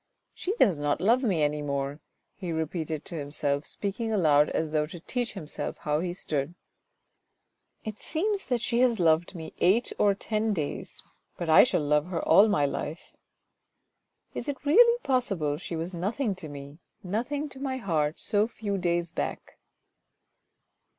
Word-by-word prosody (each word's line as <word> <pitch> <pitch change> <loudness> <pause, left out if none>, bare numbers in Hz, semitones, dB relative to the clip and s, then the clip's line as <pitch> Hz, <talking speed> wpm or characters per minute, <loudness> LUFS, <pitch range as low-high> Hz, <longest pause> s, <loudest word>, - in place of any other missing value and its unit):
"She 390 +4 -3
does 185 - +4
not 145 0 0
love 230 +8 +3
me 185 -10 +2
any 150 0 0
more," 140 0 -2 0.3
he 180 -4 -5
repeated 160 -1 -3
to 170 - -5
himself, 145 0 -2
speaking 215 +3 -3
aloud 150 -8 +4
as 160 -1 -1
though 150 -1 +1
to 170 +2 -9
teach 245 +7 -3
himself 160 -7 -4
how 150 0 -1
he 175 +1 -2
stood. 155 -3 -3 0.6
" - - -47
It 215 -1 -5
seems 395 +6 -1
that 245 -2 -1
she 240 -1 +1
has 245 -4 +3
loved 165 +2 +2
me 160 -2 -7
eight 210 +7 +3
or 200 -1 +4
ten 215 +1 -1
days, 155 -6 -4 0.3
but 170 -2 -1
I - - +9
shall 175 - +1
love 150 +2 +2
her 175 -3 -3
all 195 +7 +7
my 150 -9 +2
life." 150 +3 -5 0.6
" - - -49
Is 240 - -4
it 285 0 -5
really 470 +11 +6
possible 195 - 0
she 170 0 -6
was 165 +3 -4
nothing 205 +6 -1
to 180 -5 -9
me, 140 +2 -9 0.2
nothing 245 +10 -2
to 265 - -11
my 265 -1 -2
heart 160 -9 -1
so 210 +1 +2
few 205 -4 -3
days 175 -1 0
back - - -5
175 Hz, 170 wpm, -28 LUFS, 150-225 Hz, 0.6 s, I